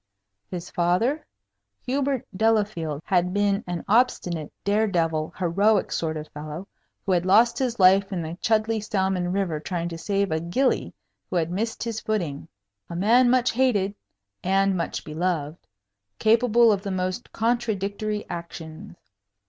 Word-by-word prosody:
His 175 Hz, -2 st, -6 dB
father? 185 Hz, -, +1 dB, 0.6 s
Hubert 270 Hz, -1 st, -1 dB
Delafield 200 Hz, -8 st, 0 dB
had 180 Hz, -1 st, +1 dB
been 205 Hz, 0 st, +1 dB
an 175 Hz, -1 st, -4 dB
obstinate, 190 Hz, -, +1 dB
dare 210 Hz, +2 st, +2 dB
devil, 165 Hz, -4 st, 0 dB
heroic 195 Hz, +4 st, +2 dB
sort 160 Hz, -1 st, -1 dB
of 155 Hz, 0 st, -6 dB
fellow, 155 Hz, +5 st, -7 dB, 0.4 s
who 195 Hz, -, 0 dB
had 175 Hz, -2 st, +2 dB
lost 215 Hz, +6 st, +4 dB
his 245 Hz, -4 st, -1 dB
life 195 Hz, +2 st, +5 dB
in 180 Hz, -3 st, -2 dB
the 160 Hz, +1 st, -5 dB
Chudleigh 220 Hz, 0 st, +1 dB
salmon 190 Hz, -3 st, 0 dB
river 185 Hz, -5 st, -1 dB
trying 170 Hz, +1 st, -3 dB
to 165 Hz, -1 st, -7 dB
save 200 Hz, 0 st, 0 dB
a 160 Hz, -, +1 dB
gillie 210 Hz, +12 st, 0 dB, 0.4 s
who -, -, -4 dB
had 170 Hz, -1 st, 0 dB
missed 225 Hz, +5 st, -2 dB
his 230 Hz, -2 st, -3 dB
footing. 175 Hz, -10 st, -3 dB, 0.4 s
A 170 Hz, -, -6 dB
man 235 Hz, +7 st, +4 dB
much 255 Hz, 0 st, +3 dB
hated 220 Hz, -6 st, +1 dB, 0.5 s
and 195 Hz, +1 st, +2 dB
much 170 Hz, -, -3 dB
beloved; 160 Hz, -1 st, -2 dB, 0.6 s
capable 230 Hz, +1 st, +4 dB
of 200 Hz, -2 st, 0 dB
the 200 Hz, -, -5 dB
most 185 Hz, -1 st, -3 dB
contradictory 215 Hz, -2 st, -1 dB
actions. 170 Hz, +2 st, -8 dB
195 Hz, 145 wpm, -25 LUFS, 170-220 Hz, 0.6 s, life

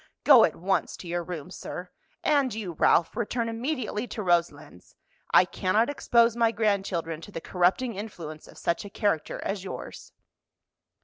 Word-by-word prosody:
Go 265 Hz, -6 st, +8 dB
at 160 Hz, -, -3 dB
once 190 Hz, +3 st, -1 dB
to 180 Hz, -, -10 dB
your 175 Hz, 0 st, -2 dB
room, 175 Hz, -1 st, -7 dB
sir. 180 Hz, -1 st, -7 dB, 0.3 s
And 280 Hz, -4 st, +2 dB
you, 210 Hz, -5 st, -4 dB
Ralph, 165 Hz, +2 st, +3 dB
return 235 Hz, +1 st, -1 dB
immediately 235 Hz, -1 st, -3 dB
to 215 Hz, -, -5 dB
Roselands. 155 Hz, -, -1 dB, 0.4 s
I 180 Hz, -, +7 dB
cannot 210 Hz, +8 st, +1 dB
expose 235 Hz, -4 st, +3 dB
my 230 Hz, -1 st, +3 dB
grandchildren 195 Hz, -7 st, -1 dB
to 205 Hz, -, -11 dB
the 165 Hz, -, -5 dB
corrupting 185 Hz, +9 st, +1 dB
influence 170 Hz, -7 st, -8 dB
of -, -, -15 dB
such 170 Hz, 0 st, -1 dB
a 205 Hz, -, -8 dB
character 200 Hz, -5 st, -1 dB
as 195 Hz, -2 st, -3 dB
yours." 195 Hz, -, -8 dB
195 Hz, 160 wpm, -27 LUFS, 175-230 Hz, 0.4 s, Go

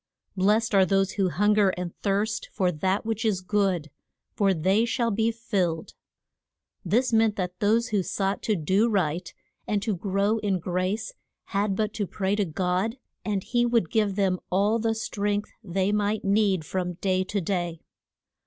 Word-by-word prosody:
Blest 210 Hz, +4 st, +2 dB
are 195 Hz, -1 st, +6 dB
those 195 Hz, 0 st, +2 dB
who 195 Hz, -3 st, 0 dB
hun 205 Hz, +6 st, +2 dB
ger 205 Hz, -2 st, +4 dB
and 180 Hz, -1 st, -5 dB
thirst 215 Hz, -, -1 dB
for 185 Hz, -3 st, +1 dB
that 185 Hz, +6 st, -1 dB
which 225 Hz, 0 st, -2 dB
is 210 Hz, -5 st, +1 dB
good, 185 Hz, -5 st, 0 dB, 0.4 s
for 200 Hz, -2 st, +2 dB
they 190 Hz, +5 st, +2 dB
shall 235 Hz, 0 st, 0 dB
be 220 Hz, +2 st, +1 dB
filled. 190 Hz, -8 st, -2 dB, 0.9 s
This 235 Hz, +7 st, +1 dB
meant 220 Hz, -1 st, +3 dB
that 180 Hz, -1 st, -4 dB
those 225 Hz, +4 st, +2 dB
who 205 Hz, -2 st, +1 dB
sought 195 Hz, +2 st, -2 dB
to 215 Hz, -, +1 dB
do 190 Hz, +7 st, +2 dB
right 175 Hz, -4 st, -1 dB, 0.4 s
and 210 Hz, -, +1 dB
to 220 Hz, -4 st, 0 dB
grow 200 Hz, +4 st, 0 dB
in 200 Hz, -3 st, 0 dB
grace 185 Hz, -, -2 dB, 0.4 s
had 200 Hz, 0 st, +1 dB
but 215 Hz, +1 st, -1 dB
to 205 Hz, -3 st, -2 dB
pray 190 Hz, +1 st, -1 dB
to 205 Hz, -1 st, +1 dB
God, 185 Hz, -, -1 dB, 0.3 s
and 200 Hz, -3 st, -1 dB
he 240 Hz, +2 st, +1 dB
would 235 Hz, -8 st, +1 dB
give 210 Hz, -3 st, +1 dB
them 190 Hz, -3 st, +1 dB
all 205 Hz, +5 st, +2 dB
the 225 Hz, 0 st, 0 dB
strength 205 Hz, -1 st, -2 dB
they 190 Hz, 0 st, 0 dB
might 210 Hz, 0 st, 0 dB
need 195 Hz, -4 st, +2 dB
from 180 Hz, 0 st, -2 dB
day 185 Hz, +1 st, 0 dB
to 205 Hz, +1 st, -2 dB
day. 175 Hz, -3 st, -2 dB
200 Hz, 170 wpm, -26 LUFS, 185-215 Hz, 0.9 s, are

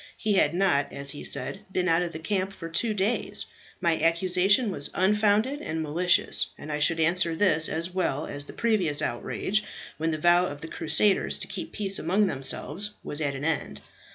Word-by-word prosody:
He 215 Hz, -, 0 dB
had 170 Hz, -4 st, +3 dB
not, 180 Hz, -7 st, +1 dB
as 140 Hz, 0 st, -4 dB
he 145 Hz, -, -9 dB
said, 195 Hz, -, -1 dB
been 185 Hz, -1 st, 0 dB
out 165 Hz, 0 st, +3 dB
of 175 Hz, -1 st, -3 dB
the 160 Hz, -, -6 dB
camp 190 Hz, +3 st, -2 dB
for 165 Hz, -3 st, -8 dB
two 220 Hz, +7 st, 0 dB
days. 205 Hz, +4 st, 0 dB, 0.3 s
My 170 Hz, -4 st, 0 dB
accusation 185 Hz, +6 st, +2 dB
was 145 Hz, -5 st, -4 dB
unfounded 210 Hz, +8 st, +2 dB
and 160 Hz, -, -3 dB
malicious, 180 Hz, +6 st, +1 dB
and 150 Hz, -, -8 dB
I 150 Hz, -, -2 dB
should 165 Hz, +2 st, +3 dB
answer 170 Hz, +1 st, +3 dB
this 160 Hz, -4 st, +3 dB
as 165 Hz, +3 st, -3 dB
well 160 Hz, -5 st, -1 dB
as 145 Hz, 0 st, -2 dB
the -, -, -10 dB
previous 190 Hz, -11 st, +1 dB
outrage, 195 Hz, -, -2 dB, 0.4 s
when 160 Hz, +1 st, 0 dB
the 155 Hz, -, -1 dB
vow 175 Hz, +3 st, +4 dB
of 145 Hz, -2 st, -8 dB
the 165 Hz, -, -6 dB
Crusaders 180 Hz, +6 st, +2 dB
to -, -, -4 dB
keep 190 Hz, -2 st, -6 dB
peace 195 Hz, -2 st, 0 dB
among 190 Hz, +6 st, +2 dB
themselves 170 Hz, +7 st, -1 dB
was 150 Hz, -, 0 dB
at 140 Hz, -2 st, -1 dB
an 135 Hz, +2 st, -5 dB
end. 165 Hz, -1 st, -2 dB
175 Hz, 195 wpm, -26 LUFS, 155-195 Hz, 0.4 s, vow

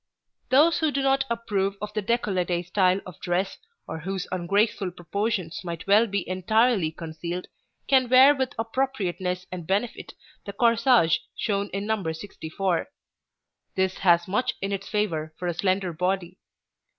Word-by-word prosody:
64] 260 Hz, -, +4 dB
Those 325 Hz, +3 st, +5 dB
who 315 Hz, -, +2 dB
do 280 Hz, -, -1 dB
not 270 Hz, 0 st, +2 dB
approve 205 Hz, -4 st, -1 dB
of 210 Hz, +1 st, -6 dB
the 215 Hz, -, -1 dB
décolleté 185 Hz, -6 st, 0 dB
style 185 Hz, +1 st, +2 dB
of 180 Hz, -, -11 dB
dress, 180 Hz, +2 st, -1 dB, 0.3 s
or 160 Hz, -, -6 dB
whose 190 Hz, +3 st, -4 dB
ungraceful 200 Hz, +3 st, +1 dB
proportions 180 Hz, +1 st, -3 dB
might 170 Hz, -2 st, -6 dB
well 210 Hz, +4 st, +5 dB
be 200 Hz, -2 st, -2 dB
entirely 195 Hz, +1 st, +2 dB
concealed, 170 Hz, +2 st, -6 dB, 0.4 s
can 260 Hz, -3 st, +4 dB
wear 260 Hz, +3 st, +8 dB
with 265 Hz, -2 st, -2 dB
appropriateness 205 Hz, -7 st, -2 dB
and 175 Hz, -3 st, -6 dB
benefit 205 Hz, +5 st, -2 dB, 0.3 s
the 200 Hz, -, -7 dB
corsage 230 Hz, -5 st, +4 dB, 0.2 s
shown 200 Hz, -2 st, -1 dB
in 200 Hz, +1 st, -4 dB
No. 210 Hz, -6 st, -1 dB
64. 170 Hz, +1 st, -3 dB, 0.9 s
This 190 Hz, 0 st, 0 dB
has 175 Hz, -2 st, +4 dB
much 210 Hz, +7 st, 0 dB
in 195 Hz, +1 st, -3 dB
its 195 Hz, 0 st, -4 dB
favor 160 Hz, -7 st, -1 dB
for 180 Hz, -, -4 dB
a 175 Hz, -, 0 dB
slender 185 Hz, +1 st, 0 dB
body. 180 Hz, +1 st, -2 dB
195 Hz, 150 wpm, -25 LUFS, 175-225 Hz, 0.9 s, wear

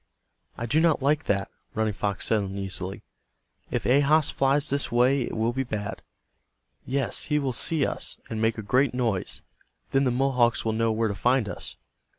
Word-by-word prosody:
"I 115 Hz, -, -3 dB
do 145 Hz, +7 st, +2 dB
not 160 Hz, -5 st, +3 dB
like 150 Hz, +3 st, +2 dB
that," 100 Hz, -1 st, 0 dB, 0.2 s
Running 110 Hz, -1 st, 0 dB
Fox 100 Hz, 0 st, -2 dB
said, 110 Hz, -2 st, +2 dB
uneasily. 95 Hz, -1 st, -5 dB, 0.7 s
"If -, -, -2 dB
Ahas 145 Hz, +3 st, +4 dB
flies 140 Hz, +2 st, +2 dB
this 140 Hz, 0 st, 0 dB
way 125 Hz, +3 st, +3 dB
it 120 Hz, -, -3 dB
will 115 Hz, +2 st, +1 dB
be 135 Hz, -, -1 dB
bad. 105 Hz, -6 st, -4 dB, 0.9 s
Yes, 135 Hz, 0 st, -1 dB
he 150 Hz, -, +1 dB
will 135 Hz, -3 st, -1 dB
see 150 Hz, +4 st, +1 dB
us, -, -, -2 dB
and 110 Hz, -1 st, -4 dB
make 110 Hz, 0 st, +1 dB
a 110 Hz, -, -5 dB
great 130 Hz, +5 st, +2 dB
noise. 115 Hz, -7 st, -1 dB, 0.5 s
Then 135 Hz, 0 st, +3 dB
the -, -, +3 dB
Mohawks 125 Hz, -2 st, +2 dB
will 110 Hz, -, +1 dB
know 115 Hz, 0 st, +1 dB
where 110 Hz, +1 st, +1 dB
to 105 Hz, -, -2 dB
find 120 Hz, +3 st, +2 dB
us." -, -, -6 dB
120 Hz, 180 wpm, -26 LUFS, 110-135 Hz, 0.9 s, Ahas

